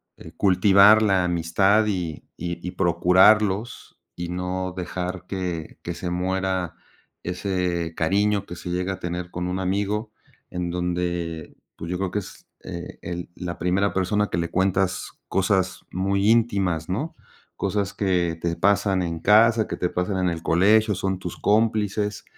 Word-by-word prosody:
eh, - - -12
cultivar 100 +2 +6
la 95 -4 +3
amistad 95 +5 +2
y 90 -6 -3
y 85 +1 -5
y 90 - -3
procurarlos, 95 +5 +3 0.2
y 85 0 -5
no 90 +1 -3
dejar 90 +1 -4
que 90 -4 -4
que 85 - -4
se 90 - -4
muera 95 0 -1 0.5
ese 90 -2 -2
cariño 100 +4 +1
que 90 - -8
se 90 - -7
llega 90 +2 -1
a 95 - -8
tener 85 0 -4
con 90 +1 -3
un 90 +1 -2
amigo, 100 +3 -1 0.4
en 90 -1 -3
donde, 85 -2 -3 0.2
pues 85 - -6
yo 90 - -1
creo 95 -1 -2
que 105 - 0
es 95 - -12 0.2
e 85 -1 -7
el 85 0 -5
la 90 -1 -5
primera 95 +4 +1
persona 105 +3 +1
que - - -2
le 85 -1 -1
cuentas 95 0 0 0.2
cosas 95 -1 0
muy 100 +3 +1
íntimas, 100 -8 +2
¿no?, 140 - -3 0.4
cosas 100 -2 -1
que 90 -4 0
te 85 -1 -1
pasan 100 0 +2
en 85 -2 -3
casa, 110 +4 +5
que - - -4
te 90 - -1
pasan 90 +2 -2
en 90 - +2
el 85 -1 -4
colegio, 105 +5 +3
son 95 0 -2
tus 90 -2 -6
cómplices 105 -1 +1
95 Hz, 160 wpm, -24 LUFS, 90-100 Hz, 0.5 s, cultivar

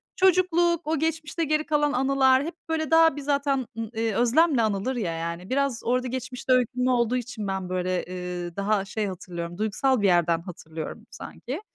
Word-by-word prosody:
çocukluk, 345 -3 +3
o 320 -1 0
geçmişte 320 +1 -1
geri 305 0 0
kalan 295 -1 +1
anılar 265 0 +3
hep 330 +3 -5
böyle 320 -1 -1
daha 325 -2 +6
bir 290 - -5
zaten 280 -2 0
ı 225 -2 -4
eee, 225 -1 -1
özlemle 255 - +3
anılır 215 +4 0
ya 185 -8 -2
yani. 170 +2 -5
Biraz 275 -2 0
orada 250 +2 0
geçmişte 255 0 -2
öykünme 250 +1 +2
olduğu 245 0 +2
için 240 -4 -5
ben 190 -1 -3
böyle 185 0 -1
,eee, 180 -1 -6
daha 200 0 0
şey 210 +1 -2
hatırlıyorum, 175 -2 -6
duygusal 220 +4 +1
bir 200 - +3
yerden 170 -2 +3
hatırlıyorum 165 +2 -8
sanki. 260 - -7
245 Hz, 175 wpm, -25 LUFS, 190-285 Hz, -, daha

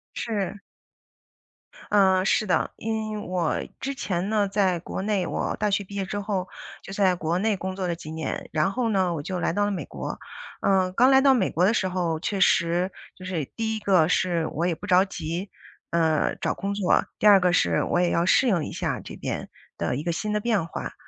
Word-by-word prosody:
是。 205 -3 -3 1.3
呃， 190 -2 +4
是 215 - +2
的， 180 -4 +1
因 220 -1 -3
为 - - -3
我 175 -4 0 0.2
之 275 +1 -3
前 185 -3 -2
呢 210 -2 +2
在 195 -3 +1
国 190 - -5
内， 200 -3 0
我 - - -2
大 210 0 0
学 200 0 +1
毕 200 +1 -11
业 195 -1 -1
之 205 +2 -4
后 195 -2 -2 0.4
就 - - -9
在 190 -3 +3
国 170 +1 -1
内 215 0 +1
工 185 0 -5
作 185 -2 -2
了 170 - -1
几 155 -2 -9
年， 160 0 -4
然 155 +5 +1
后 240 0 -1
呢 190 -4 +1
我 150 - -3
就 180 +3 -4
来 - - 0
到 205 +1 +1
了 205 - 0
美 170 -8 -3
国。 - - -6 0.4
呃， 190 -2 +2
刚 250 +6 +5
来 265 0 +6
到 270 -1 +6
美 250 - +2
国 175 - 0
的 215 - +3
时 190 - +1
候， 175 -3 -1
确 195 +3 -2
实， 175 +1 +3 0.2
就 185 - -11
是 170 -6 -2
第 220 -1 -1
一 - - -3
个 185 -6 +3
是， 175 -3 +1
我 170 +3 -2
也 170 - 0
不 205 - -9
着 185 -1 +5
急， 175 +1 -5 0.4
呃， 160 -2 +2
找 - - -1
工 200 +1 -3
作， 200 -3 +2
第 215 - +4
二 200 -2 +8
个 180 -1 +2
是 - - +2
我 175 - 0
也 175 -1 +2
要 170 +1 +2
适 255 - +4
应 175 -8 +2
一 - - -6
下 - - -2
这 - - -9
边 - - -4 0.3
的 - - -1
一 145 - -3
个 170 - -1
新 210 +6 -2
的 210 - +1
变 210 -7 0
化。 - - -6
190 Hz, 240 characters per minute, -25 LUFS, 175-205 Hz, 1.3 s, 二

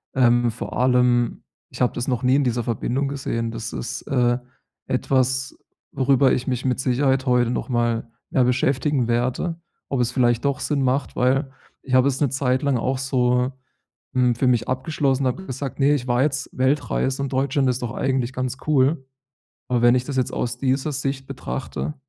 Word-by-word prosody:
Ähm, 120 -2 +4
vor 115 - -6
allem, 125 -1 +2 0.3
ich - - -9
habe 125 - +2
das 120 - -3
noch 125 -1 -1
nie 130 +1 +4
in 145 - +3
dieser 120 -1 0
Verbindung 120 +4 -1
gesehen, 115 -4 -3
das 115 0 -6
ist, 120 +1 -4
äh, 120 -2 +1 0.5
etwas, 130 +1 0 0.3
worüber 135 0 +3
ich 125 - -2
mich 125 0 -2
mit 125 -1 0
Sicherheit 130 +1 +1
heute 125 -2 +2
nochmal 120 -2 -1 0.2
mehr 130 - +2
beschäftigen 130 +1 +1
werde. 130 +8 -1 0.3
Ob 135 - -1
es 120 0 0
vielleicht 120 0 +1
doch 140 0 0
Sinn 140 0 -1
macht. 130 +1 0
Weil 135 +2 +1 0.3
ich 130 - -7
habe 130 +1 +5
es 135 -1 0
'ne 140 - +3
Zeit 130 -1 0
lang 140 -3 +2
auch 130 +3 -1
so, 125 -1 +1 0.6
hm, 125 -2 +2
für 130 +3 0
mich 120 -2 +2
abgeschlossen, 135 0 0
habe 185 +9 -2
gesagt: 135 0 -5
„Ne, 145 +2 +4
ich 130 -3 -3
war 120 +1 +2
jetzt 140 -2 -1
Weltreise 135 0 0
und 140 - -4
Deutschland 135 0 +1
ist 125 0 -1
doch 120 0 -3
eigentlich 130 -2 -1
ganz 130 0 -3
cool.“ 140 0 +2 0.6
Aber 120 -1 +1
wenn 120 +1 +6
ich 125 - +1
das 140 0 -5
jetzt 130 -2 0
aus 120 0 -2
dieser 135 +3 0
Sicht 135 0 -3
betrachte, 135 +2 -5
130 Hz, 185 wpm, -22 LUFS, 125-135 Hz, 0.6 s, wenn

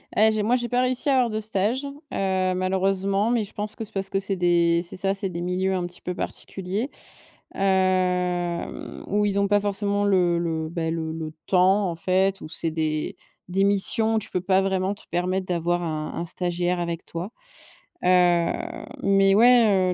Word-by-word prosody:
Eh 220 +1 +5
j'ai 215 -1 0
moi 235 +4 +3
j'ai 240 -1 -2
pas 245 +1 +2
réussi 255 +2 +1
à - - +4
avoir 250 -2 +3
de 215 0 -2
stage, 220 +5 -1
heu, 280 0 -7 0.6
malheureusement, 195 +3 +1
mais 235 -2 +2
je 200 - -9
pense 210 0 -3
que - - -5
c'est 215 - -8
parce 195 -1 -3
que 195 - 0
c'est 195 0 -1
des 170 -1 +3
c'est 175 - -8
ça, 195 +1 0
c'est 195 -1 -2
des 170 -1 -5
milieux 185 +2 0
un 180 -2 -1
petit 175 +1 -9
peu 180 - -4
particuliers, 195 +7 -4 0.7
hem, 180 -2 0
où 210 +1 +1
ils 200 -1 +1
ont 200 - +2
pas 205 +1 +3
forcément 205 0 -1
le 180 -3 +3
le 160 -2 -2
bah 165 -1 -2
le 160 -1 -3
le 160 -1 -5 0.2
temps 190 +1 +3
en 170 - -4
fait 190 +3 +1
où - - -8
c'est 165 0 -2
des 155 -1 -1 0.3
des 190 +2 +1
missions, 220 +3 +4
tu 210 - -9
peux 180 - -1
pas 190 +1 +3
vraiment 190 0 0
te 205 - -6
permettre 185 +2 -1
d'avoir 175 0 0
un 155 -2 -3
un 170 - -3
stagiaire 175 +1 -1
avec 170 -1 -3
toi, 175 +5 -6 0.7
heu, 175 -2 +4 0.5
mais 195 0 +4
ouais, 215 -5 +5
190 Hz, 195 wpm, -24 LUFS, 175-205 Hz, 0.7 s, Eh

